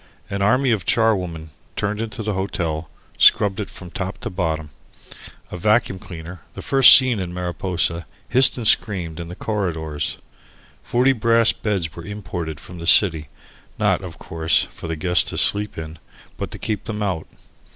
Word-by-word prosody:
An 100 0 -3
army 125 +6 +2
of 105 -5 0
charwomen, 90 -8 0 0.2
turned 105 +1 -2
into 110 0 -5
the 105 0 -2
hotel, 85 -4 -3 0.3
scrubbed 100 -1 +5
it 105 - -4
from 90 -1 -12
top 95 0 -5
to - - -5
bottom. 80 -5 -3 0.8
A - - -6
vacuum 105 0 +1
cleaner, 85 -1 -10
the - - -8
first 135 -3 +8
seen 130 -5 0
in 90 -1 -5
Mariposa, 85 -2 -2 0.2
hissed 130 +1 +4
and 120 - -4
screamed 90 -7 +2
in 85 - -6
the 90 - -9
corridors. 80 -7 -3 0.6
Forty 125 +3 +2
brass 115 -1 +3
beds 95 -7 -3
were 85 - -9
imported 85 -5 -6
from 90 +2 -12
the 85 - -5
city, 80 -6 +4 0.5
not, - - +1
of - - -9
course, 80 0 0
for - - -9
the 80 - -3
guests 90 +3 +2
to - - -5
sleep 105 0 +5
in, 80 0 -8 0.4
but - - -5
to - - -9
keep 105 -2 -4
them 105 -1 -4
out. 90 -6 -3
90 Hz, 170 wpm, -21 LUFS, 80-105 Hz, 0.8 s, first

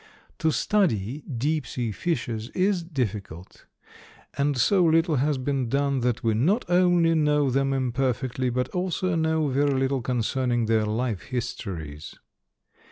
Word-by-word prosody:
To 160 - +2
study 150 - 0
deep 145 +2 -2
sea 120 -3 -3
fishes 120 - -3
is 185 0 +2
difficult, 105 - -5 0.7
and 140 -1 0
so 185 - +3
little 165 -1 +3
has 145 +2 +1
been 130 -2 -1
done 140 +1 +1
that 120 -1 -1
we 115 -1 +2
not 170 - +1
only 175 -2 +3
know 150 -3 +2
them 135 +1 +1
imperfectly 130 -1 -1
but 125 +1 -1
also 185 0 -1
know 160 -2 +1
very 140 0 +1
little 135 0 0
concerning 120 0 0
their 110 -1 +1
life 110 -2 -1
histories. 85 - -5
135 Hz, 135 wpm, -25 LUFS, 120-160 Hz, 0.7 s, so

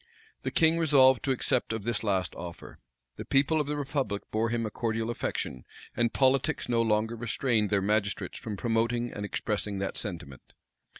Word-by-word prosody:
The - - -2
king 165 0 +3
resolved 135 -5 +5
to 135 - +1
accept 125 -1 0
of 110 -2 -3
this 115 0 -1
last 95 -6 0
offer. 85 -1 -9 0.4
The - - -5
people 145 +3 +2
of 145 - -4
the 150 0 -2
republic 135 -7 -2
bore 110 +1 +1
him 115 -1 -1
a 110 - -4
cordial 115 0 -1
affection; 65 - -3 0.3
and 120 0 +2
politics 130 +1 +2
no 120 -1 +2
longer 110 +1 +1
restrained 115 -2 0
their 100 -2 +1
magistrates 100 -2 -1
from 105 -2 -5
promoting 120 +2 0
and 105 - -5
expressing 105 0 -2
that 95 0 -3
sentiment. 85 - -7
115 Hz, 175 wpm, -29 LUFS, 105-130 Hz, 0.4 s, resolved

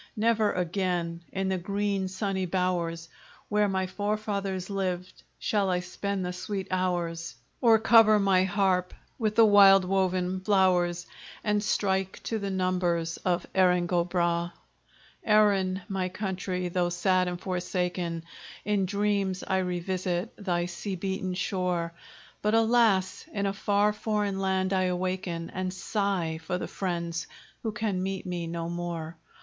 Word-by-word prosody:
Never 220 -1 +2
again, 175 -2 -1
in 190 0 -1
the 190 -1 0
green 200 +1 -1
sunny 190 0 -2
bowers 170 -2 -1 0.4
Where 210 0 +3
my 190 -1 0
forefathers 200 -1 -2
lived, 185 -2 -3 0.2
shall 200 -3 0
I 180 -1 +1
spend 190 +1 -3
the 180 - -3
sweet 190 +1 -4
hours, 170 -4 -1 0.3
Or 230 -2 +6
cover 220 -1 +6
my 195 -2 +3
harp 190 -2 +1 0.2
with 215 -2 0
the 225 - +7
wild 195 -2 +7
woven 185 -1 0
flowers, 180 -3 +2 0.4
And 210 -1 +1
strike 190 -2 0
to 225 - -2
the 200 -1 -3
numbers 180 -3 0
of 180 -1 -1
Erin 180 -2 +4
go 175 -1 +1
bragh! 175 -1 0 0.7
Erin, 200 -3 +3
my 190 -2 -2
country! 185 -1 -3
though 175 0 +1
sad 185 +1 +2
and 175 -1 -3
forsaken, 180 -2 -2 0.4
In 205 -2 +1
dreams 200 -1 0
I 190 -1 +1
revisit 180 0 -2
thy 175 -4 -1
sea 180 +3 -5
beaten 190 0 -3
shore; 180 -3 -1 0.5
But, 210 +1 +2
alas! 225 -4 +3
in 200 -1 -2
a 195 - 0
far 205 +1 +2
foreign 210 -2 -1
land 190 0 0
I 185 -1 +2
awaken, 180 -2 -2
And 185 0 -3
sigh 190 -4 -1
for 180 - -2
the - - -4
friends 170 -3 -3 0.3
who 220 - -2
can 210 -4 -2
meet 190 0 -3
me 175 -2 -3
no 165 0 -4
more! 170 -1 -4
185 Hz, 145 wpm, -28 LUFS, 180-200 Hz, 0.7 s, the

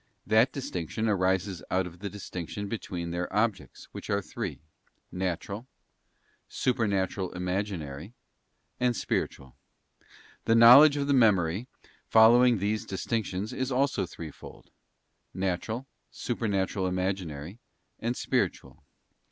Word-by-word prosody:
That 110 +5 +4
distinction 110 - -3
arises 95 -2 0
out 95 0 +1
of 90 -1 -10
the 100 +1 -4
distinction 100 0 -6
between 90 -5 -5
their 90 +1 -3
objects, 105 - -1
which - - -9
are 100 - +2
three, 100 - -5 0.5
Natural, 95 +5 -4 0.8
Supernatural 100 -6 0
Imaginary, 90 - -4 0.6
and 125 -1 +2
Spiritual. 65 - -3 0.9
The 115 - +4
knowledge 135 +6 +9
of 140 - 0
the 140 - +2
Memory, 105 -4 +3 0.4
following 120 +2 +6
these 105 +2 -1
distinctions, 105 +1 -3
is 130 +1 -2
also 130 -7 +1
threefold: 80 -3 -11 0.6
Natural, 95 +7 -2 0.2
Supernatural 100 -5 -1
Imaginary, 90 -1 -3 0.4
and 120 +2 -2
Spiritual. - - -2
100 Hz, 105 wpm, -28 LUFS, 90-115 Hz, 0.9 s, knowledge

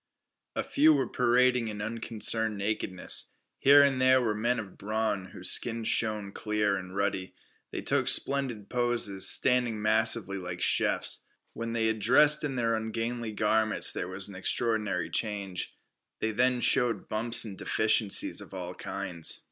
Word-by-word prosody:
A - - -1
few 310 +2 +4
were - - 0
parading 125 -1 +2
in 105 -1 -6
unconcerned 110 0 -1
nakedness. 100 -3 -1 0.2
Here 140 +1 +7
and 135 -2 +1
there 130 0 +5
were 115 -4 0
men 120 +4 0
of 105 -5 -7
brawn, 110 -2 -2
whose - - 0
skins 115 -1 0
shone 105 -3 +1
clear 105 -1 -1
and 95 0 -7
ruddy. 100 -2 -2 0.3
They - - -5
took - - 0
splendid 130 -7 0
poses, 120 -6 0
standing 125 -4 +2
massively 110 -2 +1
like 90 -1 -6
chiefs. - - +1 0.3
When 115 0 -5
they 115 -1 0
had 110 0 0
dressed 145 +8 +4
in 140 -3 -3
their 115 -2 0
ungainly 115 +1 -3
garments 110 +1 +1
there 90 - -4
was 95 +1 -4
an 100 - -10
extraordinary 105 -2 -1
change. 100 -4 -3 0.4
They 110 - -2
then 125 +2 +1
showed 120 -6 +1
bumps 115 +2 +1
and 100 -3 -7
deficiencies 110 0 +1
of - - -11
all 90 -1 -6
kinds. 90 -4 -3
110 Hz, 155 wpm, -28 LUFS, 100-120 Hz, 0.4 s, Here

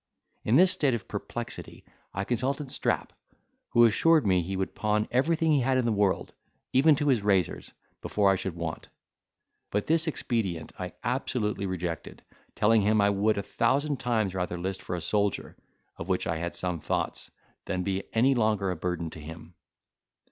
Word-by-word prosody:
In 110 - +2
this 185 +5 +7
state 145 -9 +2
of 115 - -7
perplexity, - - -6 0.3
I 95 - -3
consulted 130 +5 -2
Strap, - - -1 0.6
who 120 0 +6
assured 155 +6 +4
me 90 -2 +3
he 95 +3 -4
would 95 - -2
pawn 105 0 0
everything 160 +5 +2
he 145 - +4
had 130 +1 +2
in 130 - +1
the 115 - +2
world, 100 -2 0 0.4
even 145 +4 +6
to 145 +1 0
his 125 -5 +3
razors, 95 -4 0 0.3
before 100 -2 +2
I - - +3
should 95 -2 -4
want: 85 -2 -5 0.8
but 105 0 -1
this 165 +1 +3
expedient 110 - -2
I 90 -1 -5
absolutely 115 -5 -1
rejected, 90 -3 -5 0.3
telling 110 +1 +4
him, 105 +2 +3
I 100 0 +4
would 100 +2 +1
a 100 - -1
thousand 135 +6 0
times 110 -6 0
rather 90 -2 -2
list 95 +2 -3
for 90 - -4
a 85 - -4
soldier, 105 +1 -1 0.4
of 85 - -7
which 95 - +1
I 80 - -1
had 85 +1 -4
some 90 -2 -2
thoughts, - - -3 0.4
than 90 -1 -2
be 95 +1 -1
any 125 +5 +4
longer 110 -5 +1
a - - -2
burden 85 -1 -3
to - - -10
him. 80 +2 -10
105 Hz, 175 wpm, -28 LUFS, 90-125 Hz, 0.8 s, this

